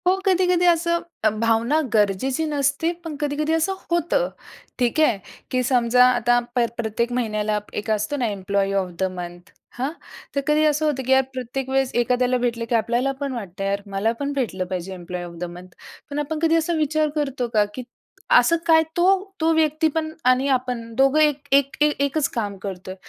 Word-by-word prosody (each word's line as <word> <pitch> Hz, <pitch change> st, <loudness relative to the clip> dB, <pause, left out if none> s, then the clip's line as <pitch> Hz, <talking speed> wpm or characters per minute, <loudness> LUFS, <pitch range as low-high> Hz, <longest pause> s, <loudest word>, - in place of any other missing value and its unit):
हो, 370 Hz, -, +5 dB
कधी-कधी 360 Hz, -2 st, +3 dB
असं 340 Hz, 0 st, +3 dB, 0.2 s
अ, 215 Hz, -, +5 dB
भावना 230 Hz, +6 st, +1 dB
गरजेची 220 Hz, +8 st, +1 dB
नसते, 290 Hz, +2 st, 0 dB
पण 325 Hz, -3 st, -5 dB
कधी-कधी 300 Hz, +2 st, 0 dB
असं 325 Hz, +4 st, +1 dB, 0.2 s
होतं. 345 Hz, +9 st, +1 dB, 0.5 s
ठीक 245 Hz, +5 st, +1 dB
आहे, 245 Hz, -9 st, +4 dB, 0.3 s
की 255 Hz, -, +1 dB
समजा 250 Hz, -1 st, +4 dB
आता 240 Hz, -1 st, +3 dB, 0.2 s
प्र 240 Hz, -1 st, +3 dB
प्रत्येक 235 Hz, +1 st, -1 dB
महिन्याला, 215 Hz, -2 st, -1 dB
एक 210 Hz, +1 st, -3 dB
असतो 215 Hz, +7 st, -1 dB
ना 250 Hz, -, 0 dB
एम्प्लॉयी 200 Hz, -1 st, -1 dB
ऑफ 185 Hz, -, -5 dB
द -, -, +1 dB, 0.2 s
मंथ. 175 Hz, 0 st, -8 dB, 0.3 s
हां, 265 Hz, +4 st, -1 dB, 0.4 s
तर 280 Hz, -, +1 dB
कधी 305 Hz, +1 st, +3 dB
असं 305 Hz, 0 st, +2 dB
होतं 280 Hz, -3 st, 0 dB
की -, -, +1 dB
यार 265 Hz, 0 st, +6 dB
प्रत्येक 260 Hz, +1 st, -4 dB
वेळेस 270 Hz, -1 st, +1 dB
एखाद्याला 250 Hz, +1 st, +2 dB
भेटलं, 235 Hz, -1 st, -1 dB
की 240 Hz, -, +2 dB
आपल्याला 240 Hz, +4 st, +1 dB
पण 280 Hz, -2 st, -2 dB
वाटतं, 195 Hz, -5 st, -6 dB
यार 200 Hz, +1 st, -1 dB
मला 200 Hz, +3 st, +1 dB
पण 285 Hz, 0 st, -2 dB
भेटलं 215 Hz, -9 st, -2 dB
पाहिजे, 185 Hz, 0 st, -4 dB
एम्प्लॉयी 180 Hz, 0 st, -6 dB
ऑफ 175 Hz, -, -9 dB
द -, -, -4 dB
मंथ 180 Hz, +1 st, -11 dB, 0.4 s
पण 290 Hz, 0 st, -3 dB
आपण 305 Hz, +1 st, -3 dB
कधी 325 Hz, 0 st, +3 dB
असा 330 Hz, +1 st, +1 dB
विचार 310 Hz, 0 st, +1 dB
करतो 275 Hz, -4 st, -1 dB
का? 210 Hz, -1 st, +4 dB
की 255 Hz, -, -6 dB, 0.5 s
असं 335 Hz, -8 st, +6 dB
काय 320 Hz, -1 st, +6 dB
तो 345 Hz, -, +3 dB, 0.4 s
तो 325 Hz, +1 st, +3 dB
व्यक्ती 315 Hz, 0 st, +2 dB
पण 315 Hz, -1 st, -1 dB
आणि 255 Hz, +2 st, +3 dB
आपण, 250 Hz, -3 st, -1 dB
दोघं 270 Hz, +4 st, +4 dB
एक 295 Hz, -2 st, +2 dB
एक 275 Hz, 0 st, +3 dB
ए 300 Hz, -, +5 dB, 0.2 s
एकच 280 Hz, +1 st, 0 dB
काम 205 Hz, -4 st, -2 dB
करतोय, 185 Hz, -1 st, -7 dB
255 Hz, 190 wpm, -22 LUFS, 215-300 Hz, 0.5 s, यार